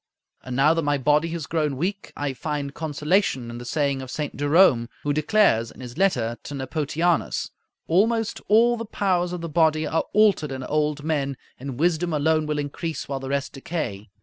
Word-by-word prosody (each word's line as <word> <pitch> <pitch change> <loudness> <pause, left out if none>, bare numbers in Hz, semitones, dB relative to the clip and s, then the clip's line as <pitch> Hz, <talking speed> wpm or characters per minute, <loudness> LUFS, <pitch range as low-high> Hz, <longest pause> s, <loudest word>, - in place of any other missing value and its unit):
And 130 -1 -5
now 145 +4 +5
that 165 - 0
my 145 -1 +1
body 150 +4 +2
has 165 -2 -4
grown 150 -4 -1
weak, 195 +6 -3
I 145 -2 -2
find 145 -1 -4
consolation 150 - 0
in 120 - -7
the 120 - -8
saying 140 0 0
of 130 - -8
St. 150 +2 -4
Jerome, 145 -5 +4
who 145 - +1
declares 150 - +3
in - - -15
his 125 -2 -8
letter 125 -11 +1
to 145 - -7
Nepotianus, 155 +5 -1 0.4
"Almost 220 +6 +1
all 235 +3 +5
the 230 - -5
powers 185 -4 0
of 180 -1 -4
the 170 - -4
body 160 -1 +2
are 160 - 0
altered 205 -9 +3
in 130 -1 -5
old 150 +1 -1
men, 140 -4 -1 0.2
and 130 -1 -6
wisdom 170 0 +1
alone 155 +1 +2
will 150 0 -1
increase 150 +3 -4
while 135 -1 -3
the 135 0 -6
rest 140 0 -2
decay." 130 - -4
150 Hz, 190 wpm, -24 LUFS, 140-170 Hz, 0.4 s, now